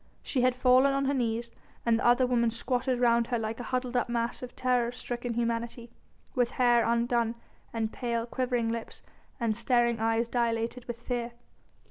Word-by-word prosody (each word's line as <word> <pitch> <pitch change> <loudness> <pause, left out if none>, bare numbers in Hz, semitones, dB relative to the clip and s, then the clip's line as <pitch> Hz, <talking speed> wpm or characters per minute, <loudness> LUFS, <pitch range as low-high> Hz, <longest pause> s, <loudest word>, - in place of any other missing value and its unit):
She 260 - 0
had 250 0 +3
fallen 255 +2 +5
on 275 0 0
her 275 - +1
knees 235 -2 -1 0.3
and 230 -1 +3
the - - -3
other 245 +2 +5
women 240 -2 +2
squatted 245 +2 -1
round 235 -1 +3
her 240 - 0
like 225 +1 -3
a - - -4
huddled 255 -1 -2
up 245 - +1
mass 235 0 -2
of 250 -1 -8
terror 250 -2 +1
stricken 240 -1 -4
humanity, 235 0 -2 0.4
with 245 -3 +2
hair 240 -2 +3
undone 235 0 +1 0.4
and 220 -1 -2
pale, 235 -2 -2
quivering 245 -2 -1
lips 230 -1 -6 0.4
and 230 -3 0
staring 235 0 +2
eyes 225 +1 +1
dilated 235 0 -1
with 235 -1 -6
fear. 240 -1 -3
240 Hz, 175 wpm, -29 LUFS, 230-250 Hz, 0.4 s, fallen